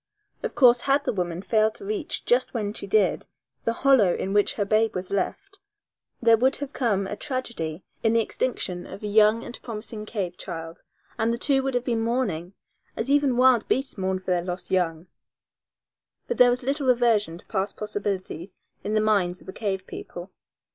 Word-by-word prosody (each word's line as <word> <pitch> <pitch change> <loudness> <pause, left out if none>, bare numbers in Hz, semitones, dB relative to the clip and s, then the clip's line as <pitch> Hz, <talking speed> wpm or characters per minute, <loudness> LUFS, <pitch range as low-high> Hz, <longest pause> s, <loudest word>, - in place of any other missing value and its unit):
Of - - -4
course, 245 -3 +6
had 280 +1 +2
the - - -1
woman 180 -2 -3
failed 215 0 +2
to 400 - -10
reach 405 -6 -3
just 250 +1 +2
when 210 -3 -2
she 200 - -6
did 205 0 +2 0.4
the 230 - +2
hollow 235 -10 +5
in 195 - -3
which 205 0 +3
her 205 - -1
babe 220 +2 +2
was 185 0 -4
left 390 - -3 0.6
there 230 -1 +5
would 260 +4 +3
have 285 -1 -6
come 205 -6 +1
a 200 - -4
tragedy 230 - -4 0.2
in 225 0 +2
the 230 - +4
extinction 210 -6 -2
of 200 - -10
a - - -2
young 215 +2 +4
and 245 - -8
promising 215 -1 -6
cave 185 -6 -3
child, 165 -1 -7 0.4
and 225 +1 +2
the 235 - -1
two 270 +2 +2
would 265 -1 -2
have 245 - +1
been 230 -2 0
mourning, 205 -7 -1 0.4
as 240 +5 -1
even 285 -4 +3
wild 255 -3 +5
beasts 270 +1 0
mourn 190 -1 -1
for 185 0 -4
their 175 -1 +1
lost 180 +1 -5
young. 170 -3 0 1.2
But - - -3
there 250 0 +8
was 245 +1 0
little 275 +1 -1
reversion 230 -8 +3
to - - -17
past 195 -1 -2
possibilities 200 -4 -4 0.3
in 210 +1 -1
the 215 - +3
minds 195 -5 +1
of - - -18
the 190 - -8
cave 190 -3 -3
people. 175 +2 -8
215 Hz, 195 wpm, -25 LUFS, 190-245 Hz, 1.2 s, there